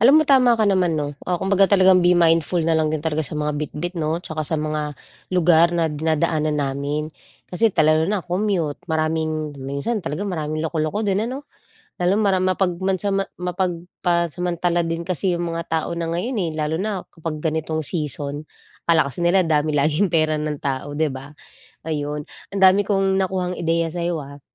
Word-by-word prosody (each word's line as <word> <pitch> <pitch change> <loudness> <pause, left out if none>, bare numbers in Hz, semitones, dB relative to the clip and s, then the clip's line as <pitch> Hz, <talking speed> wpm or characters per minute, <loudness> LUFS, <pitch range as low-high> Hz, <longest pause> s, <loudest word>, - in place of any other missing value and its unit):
alam 255 +5 +7
mo 310 - +5
tama 255 -4 +5
ka 220 - +2
naman 185 -5 +2
'no. 145 -1 -2 0.2
Oh, 180 - +2
kumbaga 195 +1 +3
talagang 190 -2 +5
be 175 0 +4
mindful 165 0 +3
na 165 - +2
lang 160 -1 +2
din 155 0 -3
talaga 160 -1 0
sa 155 0 -4
mga 150 0 -1
bitbit 160 +4 -4
'no? 160 +3 -1
Tsaka 160 -1 -4
sa 155 +1 -1
mga 150 -1 -3 0.3
lugar 170 -2 +4
na 170 - +2
dinadaanan 155 0 0
namin. 145 +2 -2 0.4
Kasi, 225 +5 +3
ta 165 -6 +2
lalo 155 +2 +3
na 205 -4 -1
commute 180 -5 -1
maraming 155 -1 -1
minsan 140 - -2
talaga 170 +3 -4
maraming 155 -4 -3
loko-loko 160 +6 -1
din 205 +3 0
ano? 275 +3 -6 0.6
Lalo 180 +2 +2
mara 200 -3 +2
mapag 185 0 +1
mansama 195 +1 0
mapag 180 -1 -2 0.2
pasamantala 175 0 0
din 165 0 -2
kasi 185 +1 0
'yung 175 - -2
mga 165 0 -3
tao 160 -1 -1
na 170 -1 -3
ngayon, 215 +9 -2
eh. - - -3
Lalo 155 +2 -1
na 200 -2 -2
kapag 160 -2 -6
ganitong 160 0 -1
season. 145 -2 -4 0.4
Akala 160 -5 +3
kasi 125 - -10
nila 175 +2 +3
dami 155 -1 +1
laging 155 +7 +2
pera 155 -2 +1
ng 150 0 -2
tao 140 +1 -3
'di 155 -2 +1
ba? 130 +1 -8 0.6
Ayun 150 -1 -3 0.2
ang 195 - -3
dami 190 +2 +6
kong 195 -1 +1
nakuhang 185 -1 -1
ideya 165 0 0
sayo, 170 0 -2
ah? 140 0 -10
165 Hz, 185 wpm, -22 LUFS, 155-185 Hz, 0.6 s, alam